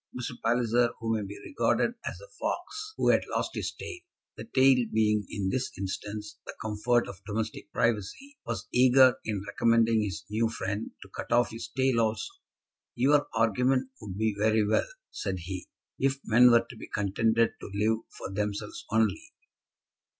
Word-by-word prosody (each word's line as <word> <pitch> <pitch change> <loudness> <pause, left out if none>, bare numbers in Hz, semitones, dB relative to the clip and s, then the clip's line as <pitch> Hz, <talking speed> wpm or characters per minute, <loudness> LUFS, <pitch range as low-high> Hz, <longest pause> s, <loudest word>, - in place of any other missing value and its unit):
Mr. 125 - -3
Palliser, 120 0 +3
who 115 0 -1
may 110 - -1
be 100 +1 -7
regarded 285 - +1
as - - -5
the - - -13
fox 430 +1 -4
who - - +2
had - - +5
lost - - -1
his - - -3
tail, 360 - -8 0.4
the - - -8
tail 130 - +4
being, 105 -2 +2
in 100 -2 -2
this 130 +4 -1
instance, 105 +2 -5
the - - -6
comfort 110 +3 +1
of 95 - -9
domestic 110 +1 -4
privacy, 120 - -1
was 115 -1 -4
eager 130 0 +6
in 105 -3 -3
recommending 115 -1 +3
his 95 -6 -4
new 110 +2 +1
friend 100 -1 -3
to - - -16
cut - - -7
off 120 0 +3
his 115 +1 -7
tail 130 -2 +3
also. 110 - -1 0.6
"Your 145 +4 +3
argument 125 +4 +2
would 100 -3 -7
be 110 -1 +1
very 110 +1 +2
well," 105 - +2 0.2
said 95 -2 -3
he, 90 +2 -6 0.3
"if 135 0 +1
men 120 +3 +6
were 120 -1 +5
to 120 - -11
be - - -9
contented 110 +3 +1
to - - -7
live 110 +2 +1 0.2
for - - -6
themselves 105 +1 -3
only." 115 - 0
115 Hz, 170 wpm, -29 LUFS, 105-125 Hz, 0.6 s, eager